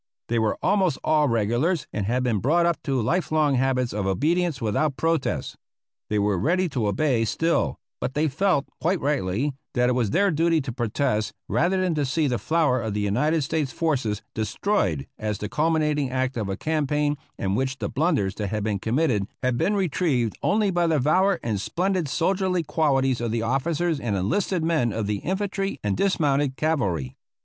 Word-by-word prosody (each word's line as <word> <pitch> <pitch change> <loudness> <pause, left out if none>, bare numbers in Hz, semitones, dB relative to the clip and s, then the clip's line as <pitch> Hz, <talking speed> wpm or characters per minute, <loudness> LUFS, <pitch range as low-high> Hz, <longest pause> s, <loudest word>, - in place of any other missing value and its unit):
They 120 0 +1
were 110 -1 0
almost 190 -6 +2
all 155 -1 +3
regulars 120 - +1
and 100 -2 -2
had 125 +3 0
been 115 -5 +1
brought 165 - +2
up 170 -1 0
to 135 -2 0
life 170 +11 0
long 155 -2 +3
habits 125 -1 +1
of 100 -2 -2
obedience 160 - +1
without 130 +6 0
protest. 165 +1 -1 0.5
They 105 - 0
were 100 -2 +1
ready 180 - +1
to 125 -7 -1
obey 120 +3 +1
still, 115 - 0 0.2
but 130 - -3
they 155 +2 +2
felt, 155 0 +1 0.2
quite 175 +3 +1
rightly, 135 -1 0 0.2
that 125 0 +3
it - - +2
was 120 -4 +1
their 200 - +2
duty 165 +1 +2
to 130 - -5
protest 110 -2 -1
rather 185 +3 +1
than 185 -2 +1
to 150 -2 0
see 155 +4 +1
the 125 -4 0
flower 155 -7 +1
of 110 -2 -3
the - - 0
United 150 +10 +1
States 150 -1 -1
forces 130 -11 -1
destroyed 105 - -1
as 105 -1 -2
the 105 - -5
culminating 150 -2 +1
act 130 +1 -1
of 110 -4 -2
a 95 - -3
campaign 150 -1 0 0.2
in 95 0 -1
which 130 +4 -1
the - - -3
blunders 140 - 0
that 105 - -2
had 105 +1 -2
been 105 -2 -1
committed 115 - 0 0.2
had 125 -1 +1
been 205 +12 +1
retrieved 150 - 0
only 205 -1 +2
by 175 -1 +1
the 160 -2 +2
valor 185 +7 +3
and 105 -4 -1
splendid 180 - -1
soldierly 180 +4 0
qualities 135 -5 +1
of 120 - -1
the 115 0 -1
officers 150 +6 0
and 115 -6 -2
enlisted 160 - 0
men 160 -8 +1
of 110 0 -2
the 105 0 -1
infantry 195 - -2
and 100 -2 0
dismounted 145 -8 +1
cavalry. 95 - -1
140 Hz, 190 wpm, -24 LUFS, 110-165 Hz, 0.5 s, all